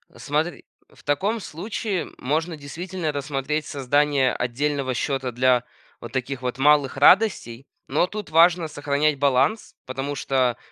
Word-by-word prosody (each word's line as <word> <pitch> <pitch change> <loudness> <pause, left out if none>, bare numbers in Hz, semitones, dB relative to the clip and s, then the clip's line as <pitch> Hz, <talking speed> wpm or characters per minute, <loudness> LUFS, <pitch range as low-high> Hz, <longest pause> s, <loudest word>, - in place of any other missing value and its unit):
Смотри. 150 +3 -2 0.3
В - - -20
таком 195 +11 0
случае 190 +2 -4
можно 160 +5 -2
действительно 165 +3 -4
рассмотреть 145 +1 -2
создание 140 0 +1
отдельного 135 +1 -1
счета 135 -1 -2
для 125 0 +3 0.4
вот 120 - -8
таких 130 0 -3
вот 125 0 -3
малых 145 -1 +3
радостей, 140 - +3 0.2
но 155 +6 +1
тут 210 -3 -7
важно 170 +1 +5
сохранять 145 0 0
баланс, 140 - +1
потому 135 +2 -4
что, 130 -3 0
145 Hz, 130 wpm, -23 LUFS, 135-160 Hz, 0.4 s, важно